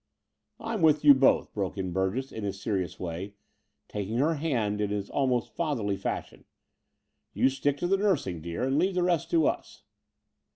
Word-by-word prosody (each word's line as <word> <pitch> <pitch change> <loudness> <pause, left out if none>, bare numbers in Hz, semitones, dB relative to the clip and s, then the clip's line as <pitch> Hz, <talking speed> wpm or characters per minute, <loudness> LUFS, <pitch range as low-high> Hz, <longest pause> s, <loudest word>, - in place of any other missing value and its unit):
"I'm 225 -4 -3
with 150 -2 +4
you 145 - +10
both," 135 0 +3
broke 100 -2 -3
in 95 -2 -3
Btu 95 +2 0
gess 135 +1 -4
in 110 - -6
his 100 -1 -3
serious 95 -4 -2
way, 90 +3 -5 0.5
taking 105 +2 -3
her 150 +6 +2
hand 120 -10 -1
in 105 - 0
his 100 -1 -3
almost 125 -4 0
fatherly 125 -12 -1
fashion. - - -5 0.9
"You 130 - +4
stick 135 +1 -1
to 175 - -1
the 195 +2 +3
nursing, 155 - 0
dear, 85 +6 -4
and 135 +3 +1
leave 185 +2 +1
the 180 - +2
rest 170 -2 +1
to 165 -3 +3
us." - - -3
125 Hz, 180 wpm, -28 LUFS, 100-155 Hz, 0.9 s, you